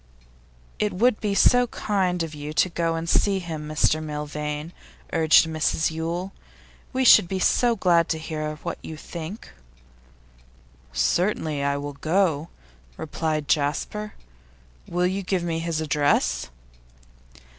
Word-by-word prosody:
'It 210 - +1
would 220 +4 +2
be 205 -2 -1
so 245 +4 +5
kind 185 -6 -1
of 160 -1 -6
you 150 0 -6
to 185 - +3
go 165 -1 -1
and 165 0 -4
see 195 +3 +2
him, 160 -4 -5
Mr 155 +1 +2
Milvain,' 150 +1 -5 0.4
urged 160 0 +5
Mrs 160 0 0
Yule. 170 +4 -3 0.6
'We 260 -1 0
should 180 - +8
be 190 - -2
so 235 +5 +3
glad 175 -4 +3
to 160 - 0
hear 155 -1 -4
what 170 - -4
you 160 - -8
think.' 170 +6 -8 1.4
'Certainly, 155 - 0
I 140 0 0
will 145 0 -5
go,' 160 0 0 0.5
replied 155 -1 -2
Jasper. 155 +8 -1 0.7
'Will 175 +1 0
you 190 +2 0
give 185 -1 -1
me 165 -1 -2
his 165 -1 -2
address? 145 -1 +1
165 Hz, 135 wpm, -24 LUFS, 155-185 Hz, 1.4 s, should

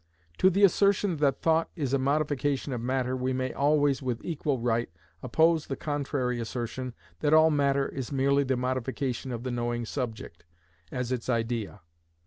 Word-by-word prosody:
To 185 - +6
the 195 +2 +1
assertion 200 -1 +3
that 145 -2 +1
thought 165 0 +2
is 140 -6 -2
a 140 - +3
modification 145 0 0
of 120 - -3
matter 130 +1 -1
we 130 0 -1
may 130 0 -2
always, 145 -1 +2
with 125 -3 -3
equal 150 -4 -1
right, 120 0 0 0.3
oppose 160 +5 +2
the 135 - -3
contrary 135 -5 -2
assertion 120 +1 -4 0.2
that 150 0 +3
all 160 0 +6
matter 140 -2 +2
is 130 -1 -6
merely 140 +1 +2
the 130 -1 0
modification 130 +1 -2
of 120 -1 -5
the 130 - -3
knowing 120 0 -2
subject, 115 -9 -5 0.5
as 125 -1 -3
its 125 -1 -3
idea. 115 -4 -2
130 Hz, 165 wpm, -28 LUFS, 125-145 Hz, 0.5 s, To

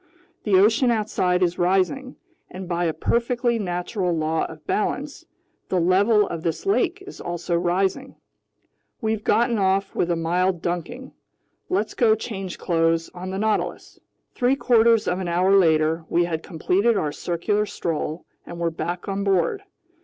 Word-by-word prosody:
The 205 -3 +3
ocean 225 +6 +4
outside 195 -5 +1
is 175 0 0
rising, 195 +9 +1 0.3
and 185 0 -8
by 175 0 -1
a 165 - +1
perfectly 235 +7 0
natural 180 -1 -2
law 160 +1 0
of 155 -1 -11
balance, 285 +9 -2 0.4
the 185 - +1
level 200 +5 +3
of 165 - -5
this 165 - -3
lake 390 -1 +1
is 385 - -10
also 175 0 -3
rising. 190 +9 -1 0.8
We've 220 -2 -2
gotten 235 +1 +2
off 195 0 +1
with 175 - 0
a 170 - +2
mild 175 +2 0
dunking. 180 +10 -4 0.6
Let's 205 +4 -1
go 220 -3 +3
change 195 -5 -6
clothes 165 -1 0
on 185 +1 -7
the 190 - -4
Nautilus." 215 +1 -2 0.3
Three 250 +2 +2
quarters 230 -4 +3
of 180 - 0
an 185 - -3
hour 180 +3 +3
later, 160 -2 +3
we 175 - +2
had 160 -2 -3
completed 195 +7 +1
our 150 -5 -1
circular 205 +7 -1
stroll 160 -2 -3 0.2
and 170 - -9
were 170 -1 0
back 175 +2 -4
on 200 0 -2
board. 195 - +1
185 Hz, 155 wpm, -23 LUFS, 170-220 Hz, 0.8 s, ocean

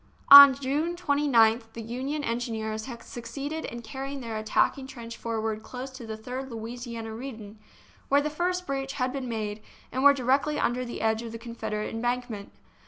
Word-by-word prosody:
On 280 -1 +12
June 285 +6 -1
29th 245 -8 +2
the 230 - -6
Union 265 +6 -3
engineers 220 -3 -3
had 235 -3 -8
suc 240 -1 -9
ceeded 285 +6 -4
in 235 0 -7
carrying 270 +5 -6
their 230 -3 -5
attacking 220 +5 +1
trench 235 -4 -8
forward 220 -2 -3
close 255 +3 -7
to 260 -3 -10
the 220 0 -5
Third 255 +4 -6
Louisiana 230 -1 -6
Redan, 220 -4 -8 0.5
where 280 - +5
the 300 +1 -2
first 360 +3 -1
breach 270 -2 -3
had 255 -2 -1
been 265 -3 -4
made, 215 -2 -3 0.3
and 260 - -2
were 285 0 +8
directly 275 +3 +1
under 250 -1 0
the 235 - -6
edge 220 0 +1
of 230 -1 -7
the - - -5
Confederate 230 -2 -5
embankment. 240 -3 -3
245 Hz, 175 wpm, -27 LUFS, 225-275 Hz, 0.5 s, On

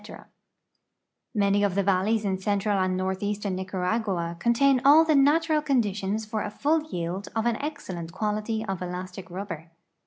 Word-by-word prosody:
jNlany 200 0 +3
of 200 -3 +1
the 200 - +2
valleys 200 +3 +1
in 190 -1 -1
central 200 +1 0
and 185 0 +1
northeastern 200 +2 -2
Nicaragua 185 -1 -2
contain 255 +4 +3
all 300 +4 +7
the 315 - +3
natural 305 +2 +4
conditions 215 -6 0
for 215 0 -3
a 210 - -3
full 300 +9 +1
yield 175 - -4
of 225 0 0
an 235 -2 +1
excellent 185 - -5
quality 215 +3 -2
of 195 -3 -4
elastic 180 +1 -6
rubber. 175 -3 -6
205 Hz, 150 wpm, -26 LUFS, 185-230 Hz, -, all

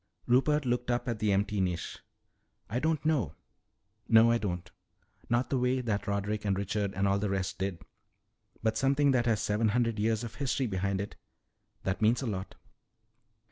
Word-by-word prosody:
Rupert 140 +4 +3
looked 125 0 -1
up 120 0 0
at 115 -3 -2
the 105 -1 +2
empty 100 +1 +1
niche. 90 -2 -2 0.7
"I 120 - 0
don't 160 +1 0
know 140 - +1 0.7
No, 115 +1 +7
I 115 - +2
don't. 90 -4 -3 0.6
Not 120 +1 +1
the 135 - +2
way 125 +1 +1
that 110 -5 -2
Roderick 100 +1 -1
and 100 -2 0
Richard 100 0 -2
and 100 +1 +1
all 100 0 +2
the 105 0 -1
rest 95 0 -2
did. 95 -3 -3 0.8
But 110 0 +1
something 140 +2 +3
that 120 -2 +2
has 110 -4 +1
seven 105 +2 +1
hundred 115 -1 +1
years 110 +1 +1
of 115 -2 -6
history 130 +2 -1
behind 100 -2 -1
it 100 - -7 0.7
that 95 +2 -2
means 115 +5 +3
a - - -2
lot." 95 -4 -4
110 Hz, 180 wpm, -30 LUFS, 100-125 Hz, 0.8 s, No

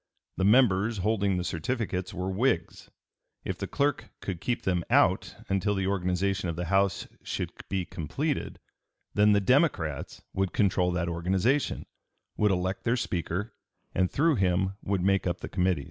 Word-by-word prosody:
The 95 - +1
members 110 -1 +4
holding 100 -1 +1
the 90 - -1
certificates 95 +1 -2
were 90 +1 -3
Whigs; 95 -4 -1 0.6
if - - -2
the - - -3
clerk 140 -5 0
could 90 -4 -5
keep 120 +2 -1
them 90 -2 +1
out - - +3
until 100 +1 +1
the 95 -1 -1
organization 95 0 0
of 85 - -3
the 90 +1 -3
House 100 0 +2
should - - -3 0.2
be 95 -2 -1
completed, 140 - -3 0.6
then 105 0 +5
the 100 - +4
Democrats 100 - +1
would 95 -1 -1
control 95 -3 +2
that 90 -1 -1
organization, 95 +11 0 0.5
would 105 - +3
elect 95 0 -1
their 115 +2 +2
Speaker, 100 0 -2 0.4
and 90 0 +2
through 155 -1 +2
him 95 0 +1
would 100 -2 -1
make 95 0 +2
up 85 0 -2
the - - -5
committees. 90 -3 +1
95 Hz, 160 wpm, -28 LUFS, 90-105 Hz, 0.6 s, then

